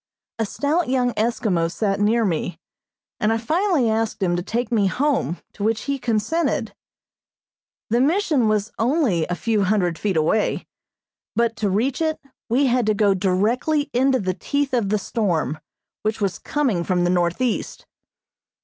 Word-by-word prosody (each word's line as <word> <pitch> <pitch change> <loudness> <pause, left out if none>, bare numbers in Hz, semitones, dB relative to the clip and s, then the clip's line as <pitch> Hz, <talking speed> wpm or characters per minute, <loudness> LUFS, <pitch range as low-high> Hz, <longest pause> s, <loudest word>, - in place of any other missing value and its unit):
A 225 - 0
stout 300 - 0
young 250 -2 +1
Eskimo 210 -7 0
sat 200 0 -1
near 220 +2 +2
me, 175 -1 -2 0.6
and 215 - +2
I 225 - +2
finally 315 - +1
asked 220 -2 -1
him 175 -2 +1
to 175 - -1
take 235 +5 -3
me 210 -4 +3
home, 270 - 0 0.2
to - - -12
which 220 +1 +1
he 280 -1 -2
consented. 240 +8 0 1.2
The 240 +2 +3
Mission 300 - +2
was 215 0 0
only 230 - +1
a 180 - -2
few 215 +2 0
hundred 180 -4 +1
feet 195 -5 0
away, 165 +8 +1 0.7
but 230 -1 +1
to 210 - 0
reach 245 - 0
it 315 -1 0 0.3
we 260 +5 +3
had 245 -3 +2
to 215 - +3
go 205 -1 +3
directly 230 - +1
into 260 +1 +3
the 185 -2 -1
teeth 285 +7 -2
of 230 -6 +1
the 215 - +2
storm, 170 - -1 0.4
which 215 +1 -1
was 195 -4 -1
coming 255 -13 0
from 180 0 +1
the 175 - +2
northeast. 180 +7 -1
220 Hz, 160 wpm, -22 LUFS, 195-255 Hz, 1.2 s, me